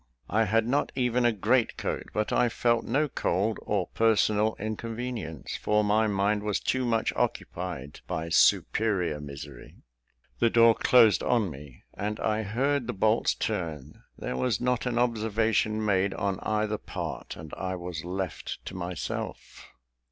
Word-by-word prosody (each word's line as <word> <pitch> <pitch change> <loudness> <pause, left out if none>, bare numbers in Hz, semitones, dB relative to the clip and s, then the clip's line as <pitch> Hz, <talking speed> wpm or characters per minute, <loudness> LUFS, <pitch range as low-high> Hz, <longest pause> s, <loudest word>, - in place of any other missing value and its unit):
I 110 +3 +3
had 110 +2 +2
not 140 +4 +1
even 125 -1 +1
a 120 - +5
great 115 +3 +1
coat; - - -3
but 105 0 -1
I 120 - +3
felt 120 0 +1
no 145 +5 +1
cold 105 -3 0
or 100 -4 -1
personal 110 -1 +2
inconvenience, 110 - -5
for 105 0 +1
my 110 +1 +3
mind 105 +1 +1
was 105 -1 -1
too 130 0 0
much 115 -2 +1
occupied 85 -6 -3
by 80 +1 -3
superior 90 -2 +2
misery. 70 -1 -9 0.6
The 115 - +4
door 115 0 +6
closed 115 -2 +5
on 110 -7 +1
me, 70 -3 -12
and 105 +1 -3
I 110 0 0
heard 125 +5 0
the - - -2
bolts 110 +3 +2
turn. 80 -9 -4 0.2
There - - -4
was 125 - 0
not 125 0 0
an 120 -1 -1
observation 110 -2 +1
made 100 -1 +1
on 100 -1 -1
either 105 0 -1
part, - - -6
and 80 -1 -10
I 95 -1 -3
was 85 -3 -6
left 95 +1 -4
to - - -6
myself. 90 -1 -5
105 Hz, 150 wpm, -28 LUFS, 95-115 Hz, 0.6 s, door